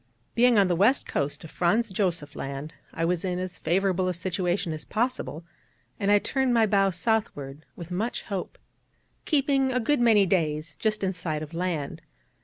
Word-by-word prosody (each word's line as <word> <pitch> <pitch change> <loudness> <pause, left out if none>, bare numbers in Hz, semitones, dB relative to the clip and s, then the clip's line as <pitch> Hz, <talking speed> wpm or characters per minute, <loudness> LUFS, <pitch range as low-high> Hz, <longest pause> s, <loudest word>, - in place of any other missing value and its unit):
Being 240 -1 +4
on 200 -2 +5
the 175 - +1
west 220 - +3
coast 145 +3 -2
of 160 - -10
Franz 215 +5 +1
Josef 175 -7 -1
Land, 140 +3 -5 0.2
I 165 - -1
was 175 0 0
in 180 -2 -1
as 180 -1 -5
favourable 185 +2 +1
a 180 - -1
situation 180 -1 -1
as 155 - -6
possible, 225 - -2 0.6
and 200 - 0
I 205 - +7
turned 260 +3 0
my 225 -1 +5
bow 195 -2 +3
southward 170 - -2
with 170 0 -9
much 215 +7 -2
hope, 195 -4 -5 0.7
keeping 275 -3 +2
a 250 - +1
good 290 +4 +1
many 225 -4 +5
days 155 -4 0
just 215 -2 -1
in 190 0 +1
sight 160 -3 -3
of 155 - -10
land. 170 -5 -3
185 Hz, 180 wpm, -26 LUFS, 165-220 Hz, 0.7 s, I